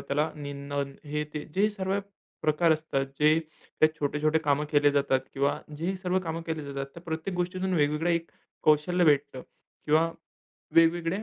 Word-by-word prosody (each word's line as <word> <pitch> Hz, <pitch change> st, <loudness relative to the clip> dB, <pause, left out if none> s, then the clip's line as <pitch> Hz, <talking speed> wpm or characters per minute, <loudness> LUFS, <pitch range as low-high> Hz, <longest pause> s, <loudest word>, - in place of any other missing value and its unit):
त्याला 150 Hz, +3 st, 0 dB
निं 145 Hz, -2 st, -7 dB
नण 140 Hz, -1 st, -2 dB
हे 150 Hz, +1 st, -2 dB
ते 150 Hz, -, -4 dB
जे 200 Hz, +3 st, +3 dB
सर्व 195 Hz, -1 st, -1 dB, 0.4 s
प्रकार 155 Hz, +2 st, +3 dB
असतात 155 Hz, -3 st, -1 dB
जे 155 Hz, +1 st, +5 dB, 0.4 s
ते 155 Hz, -, +8 dB
छोटे-छोटे 150 Hz, +2 st, +1 dB
कामं 150 Hz, -1 st, +1 dB
केले 145 Hz, -1 st, +4 dB
जातात 140 Hz, -2 st, +2 dB
किंवा 140 Hz, +1 st, +1 dB, 0.2 s
जे 165 Hz, +3 st, -4 dB
ही 190 Hz, +1 st, -1 dB
सर्व 185 Hz, 0 st, 0 dB
कामं 165 Hz, 0 st, -3 dB
केली 160 Hz, -1 st, -3 dB
जातात 140 Hz, -1 st, -4 dB
त्या 170 Hz, -, -11 dB
प्रत्येक 165 Hz, +2 st, -4 dB
गोष्टीतून 185 Hz, +1 st, -1 dB
वेगवेगळं 150 Hz, +1 st, +1 dB
एक 170 Hz, 0 st, -1 dB, 0.3 s
कौशल्य 155 Hz, +4 st, +3 dB
भेटतं 140 Hz, -4 st, +2 dB, 0.4 s
किंवा 160 Hz, +2 st, +3 dB, 0.6 s
वेगवेगळ्या 165 Hz, +3 st, +3 dB
155 Hz, 165 wpm, -28 LUFS, 145-170 Hz, 0.6 s, ते